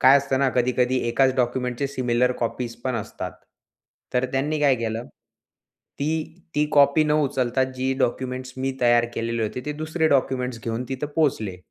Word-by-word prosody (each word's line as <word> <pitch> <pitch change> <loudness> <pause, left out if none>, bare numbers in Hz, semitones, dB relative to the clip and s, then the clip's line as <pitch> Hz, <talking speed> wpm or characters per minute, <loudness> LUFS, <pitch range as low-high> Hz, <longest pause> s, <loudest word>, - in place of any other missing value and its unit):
काय 135 +2 +8
असतं 135 -1 -1
ना, 135 -1 +3
कधी-कधी 125 +1 +1
एकाच 130 +2 +3
डॉक्युमेंटच्या 125 +1 0
सिमिलर 125 -2 +1
कॉपीज 120 0 -2
पण 130 -2 0
असतात. 105 - -5 0.8
तर 125 +1 +2
त्यांनी 150 +3 0
काय 140 -3 +5
केलं, 115 +1 -3 0.9
ती 160 +2 -1 0.2
ती 150 0 +3
कॉपी 145 +2 +5
न 150 - +1
उचलता, 130 -2 +1
जी 130 0 -2
डॉक्युमेंट्स 130 0 -2
मी 135 +1 -1
तयार 120 -1 +5
केलेले 115 0 -1
होते, 110 +4 -3
ते 150 - -1
दुसरे 155 +2 0
डॉक्युमेंट्स 125 -4 0
घेऊन 115 +2 -2
तिथे 135 +2 -2
पोहोचले. 110 - +1
130 Hz, 160 wpm, -24 LUFS, 120-140 Hz, 0.9 s, काय